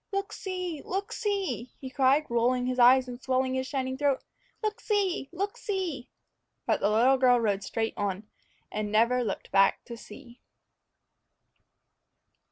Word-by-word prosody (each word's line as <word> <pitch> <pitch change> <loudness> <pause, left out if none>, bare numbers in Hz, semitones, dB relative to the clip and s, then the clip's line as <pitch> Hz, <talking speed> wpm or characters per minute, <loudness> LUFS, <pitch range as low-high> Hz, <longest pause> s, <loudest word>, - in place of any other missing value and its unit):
"Look 395 +1 -2
see! 365 -5 -4
look 390 +2 -3
see!" 385 - -2
he 260 -1 -8
cried, 275 +3 +3
rolling 245 +1 +1
his 255 0 -2
eyes 255 +1 +6
and 245 0 -8
swelling 260 0 0
his 260 0 -2
shining 260 -1 -3
throat; 285 -2 +1 0.4
"look 430 0 -1
see! 390 -9 0
look 395 +4 -3
see!" 360 - -3 0.6
But - - +1
the 205 - +2
little 250 +5 +4
girl 250 -1 +5
rode 205 -3 0
straight 225 -1 -2
on, 205 0 -3 0.4
and 210 -1 -3
never 235 +3 +3
looked 210 - -4
back 195 0 +3
to 235 - -7
see. 235 +2 -13
260 Hz, 150 wpm, -28 LUFS, 235-340 Hz, 0.6 s, eyes